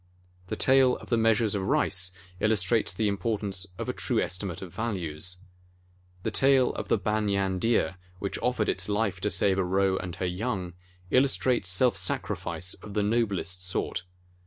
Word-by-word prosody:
The - - -3
tale 130 -1 +4
of - - -13
the 120 - +2
Measures 115 -1 +3
of 100 - -1
Rice 95 -1 +2 0.3
illustrates 110 0 +2
the 105 +4 0
importance 100 -2 -1
of - - -4
a - - -1
true - - 0
estimate 90 -1 -2
of 90 - -10
values. 90 -5 -3 0.8
The - - -1
tale 135 -2 +4
of - - -5
the - - +3
Banyan 100 -2 0
Deer, 115 -3 +1 0.2
which 100 +1 -4
offered 120 -3 0
its 90 +2 -1
life 105 -3 0
to 105 - 0
save 95 -2 +2
a - - +2
roe 95 +1 +1
and 90 -1 -5
her 90 - -3
young, 90 -1 -3 0.4
illus 135 +1 +4
trates 125 -6 +1
self 95 +5 +3
sacrifice 90 -2 -2
of 105 0 -11
the 105 - +2
noblest 100 -4 0
sort. 90 -1 -2
100 Hz, 170 wpm, -27 LUFS, 90-110 Hz, 0.8 s, tale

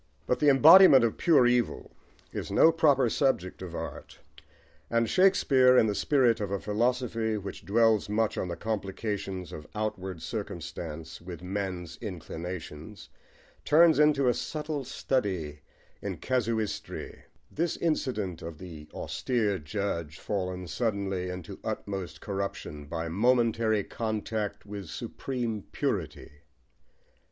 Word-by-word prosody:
But 125 - 0
the 150 - +5
embodiment 145 0 +9
of 115 - 0
pure 160 -8 +5
evil 120 -1 +1 0.4
is - - -4
no 165 - +6
proper 145 -6 +3
subject 110 -9 0
of 90 -2 -7
art, - - -7 0.7
and 115 0 +2
Shakespeare, 130 - +5
in - - +6
the 105 - 0
spirit 120 -1 +2
of 100 - -2
a 100 0 -2
philosophy 115 +2 0
which 100 -1 -7
dwells 110 +2 +3
much 110 +1 +1
on - - -2
the 85 - -4
complications 100 -2 -4
of 75 -1 -8
outward 95 -5 -4
circumstance 80 0 -6
with 85 -1 -9
men's 90 -3 -4
inclinations, 90 -2 -7 0.5
turns 160 0 +5
into 150 -3 +4
a 125 - +4
subtle 150 0 -4
study 95 - -2 0.4
in - - -4
casuistry 115 -4 -3 0.3
this 170 +2 -1
incident 120 - -1
of 80 -1 -7
the 80 -3 -10
austere 110 -6 -1
judge 85 -2 -3
fallen 90 -3 -3
suddenly 95 -2 -2
into 90 -2 -7
utmost 95 -5 -5
corruption 95 -7 -4
by 80 +3 -4
a - - -4
momentary 115 0 +2
contact 110 -2 -3
with 100 -3 -7
supreme 120 - -4
purity. - - -3
105 Hz, 125 wpm, -28 LUFS, 90-125 Hz, 0.7 s, embodiment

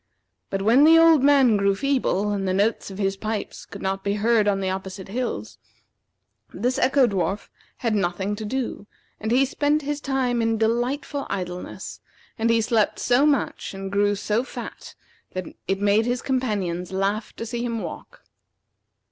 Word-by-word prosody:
But 195 0 -2
when 235 +7 +5
the 325 +2 +8
old 330 -3 +6
man 270 -5 +5
grew 200 0 +2
feeble, 245 -6 0
and 195 -2 -1
the 185 - +1
notes 205 +3 +1
of 190 - -8
his 195 -1 0
pipes 215 +1 -5
could 200 - -9
not 195 0 -2
be 200 0 0
heard 215 0 +2
on 200 -1 +2
the 190 -1 -1
opposite 190 0 -6
hills, 110 - -4 0.9
this 245 +7 -1
Echo 265 +1 +4
dwarf 195 -2 -2 0.3
had 230 -3 -1
nothing 195 +1 -1
to 220 - -5
do, 230 -2 -3 0.3
and 220 - -3
he 255 +4 +4
spent 295 +2 0
his 295 +1 -3
time 260 -4 0
in 225 0 +1
delightful 245 +6 -1
idleness; 180 -2 -5 0.4
and 225 +1 +2
he 230 0 +4
slept 220 -1 +1
so 250 +4 +3
much 280 -8 -1
and 195 0 -6
grew 205 0 +2
so 210 +3 0
fat - - -9 0.4
that 185 -1 -3 0.2
it 195 0 0
made 205 +3 +3
his 245 0 -1
companions 200 -10 -1
laugh 195 +3 -1
to 230 - -5
see 235 +1 -3
him 230 -2 -2
walk. - - -9
215 Hz, 175 wpm, -24 LUFS, 195-250 Hz, 0.9 s, the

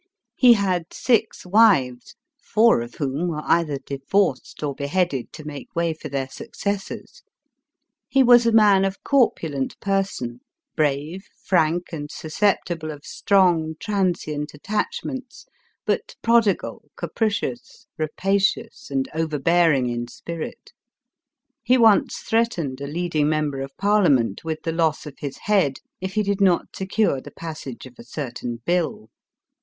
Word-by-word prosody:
He 250 -2 +7
had 185 -5 -1
six 225 -5 0
wives, 180 - +3 0.2
four 230 - +3
of 120 - -8
whom 145 +4 -2
were 155 -3 -3
cither 160 -4 +2
divorced 140 +3 -1
or 140 -2 -2
bc 140 0 -4 0.2
.1, 130 -4 -5
to 155 - -10
make 145 -4 -8
way 170 -1 +1
for 160 - -9
their 135 -1 -2
successors. 200 +8 -5 0.9
He 270 - +4
was 240 -1 +6
a - - +4
man 205 -3 +5
of 195 +1 -2
corpulent 160 - +1
person, 195 -12 -2 0.4
brave, 150 +6 -1 0.2
frank 175 -1 +1
and 145 -2 -5
susceptible 165 0 -1
<>1 145 -1 -9
>trong, 175 -5 +4
transient 175 -8 -2
attachments, 260 - -4 0.4
but - - -1
prodigal, 230 -4 +1
capri 225 -2 0
cious, 240 +4 -5
rapacious, 195 +6 -1
and 135 -1 -1
overbearing 160 -2 +2
in 120 0 -3
spirit 165 +6 -8 0.9
He 255 - +3
once 225 -4 +4
threatened 175 - 0
a 140 - -4
leading 155 -1 0
member 150 -3 -1
of 135 0 -7
parliament 160 - +2
with 160 -1 -4
the; 160 -3 -1
his 140 -2 -5
head, 190 -11 +2 0.2
if 190 +2 -5
he 215 - +2
did 200 0 -1
not 185 -3 +2
secure 190 -7 0
the - - -10
passage 155 -7 -8
of 130 - -12
a 120 +6 -9
o 145 - 0
i 125 - -8
tain 120 -1 -6
bill. 170 -11 -1
165 Hz, 140 wpm, -23 LUFS, 145-200 Hz, 0.9 s, He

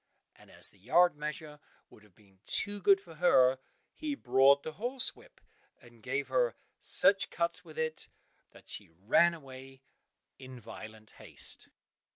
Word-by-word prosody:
And - - -20
as - - -1
the 100 - -17
yard 175 - +3
measure 150 0 -6 0.3
would - - -18
have 105 -4 -23
been 100 -3 -25
too 205 0 +1
good 195 +1 +5
for 175 -4 -15
her, 130 -7 +4 0.3
he 300 -2 -4
brought 140 - +4
the 160 - -5
horsewhip, 265 - -2 0.4
and 120 -2 -19
gave 135 +5 -3
her - - +1 0.2
such 195 -1 +3
cuts 170 +1 -2
with 160 -3 -14
it 160 0 -3 0.4
that - - -19
she - - -6
ran 105 - +2
away 135 -2 -13 0.6
in 130 -1 -11
violent 110 -1 -12
haste. - - -4
150 Hz, 150 wpm, -31 LUFS, 125-180 Hz, 0.6 s, good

